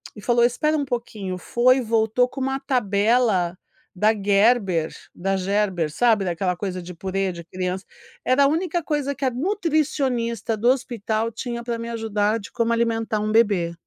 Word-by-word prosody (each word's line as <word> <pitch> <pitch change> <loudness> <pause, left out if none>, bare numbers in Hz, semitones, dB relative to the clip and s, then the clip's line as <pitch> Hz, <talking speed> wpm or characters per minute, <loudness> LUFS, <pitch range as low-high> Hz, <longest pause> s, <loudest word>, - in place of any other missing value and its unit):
e 210 - -10
falou: 235 +2 +2
"Espera 305 +6 +2
um 285 - -1
pouquinho", 215 -7 -4
foi 255 +7 +3
voltou 225 +2 +2
com 270 - -7
uma 270 +1 -1
tabela 210 -6 +1 0.4
da 215 +4 +3
Gerber, 200 -4 +2 0.2
da 195 +2 -1
Gerber, 190 -4 0
sabe 225 0 +3
daquela 180 +1 -1
coisa 185 -1 -4
de 180 +1 -9
purê 190 +2 -2
de 170 -1 -9
criança, 185 +1 -4 0.4
era 260 +2 +4
a - - +6
única 340 +2 0
coisa 290 -3 -1
que 270 - -4
a - - +3
nutricionista 265 - -1
do 240 +4 +2
hospital 230 -3 -1
tinha 235 +1 -5
para 235 -1 -3
me 230 0 -6
ajudar 220 -1 0
de 205 - -11
como 230 -1 0
alimentar 225 -2 0
um 215 0 -1
bebê. 200 -7 +2
225 Hz, 170 wpm, -23 LUFS, 195-250 Hz, 0.4 s, a